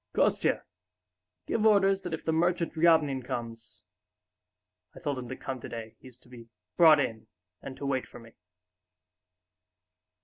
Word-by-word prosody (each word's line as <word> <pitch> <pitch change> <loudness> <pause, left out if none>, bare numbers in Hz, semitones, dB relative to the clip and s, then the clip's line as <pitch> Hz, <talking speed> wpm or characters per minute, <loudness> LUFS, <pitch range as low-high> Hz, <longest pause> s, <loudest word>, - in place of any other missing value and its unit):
"Kostya, - - +1 0.8
give 220 - -1
orders 195 -3 +4
that 180 -3 -6
if - - -14
the 160 - +1
merchant 170 +1 0
Ryabinin 160 -5 +3
comes... 115 -2 -7 1.1
I - - -10
told 145 -5 -3
him 125 -1 -8
to 130 - -5
come 130 -2 -6
today, 110 -1 -8
he's 130 -2 -13
to - - -21
be 120 -2 -13 0.3
brought 160 -3 +7
in 115 -5 -3 0.3
and 130 - -9
to 140 - -6
wait 135 -2 -1
for - - -13
me...." 115 -1 -15
135 Hz, 145 wpm, -28 LUFS, 120-165 Hz, 1.1 s, brought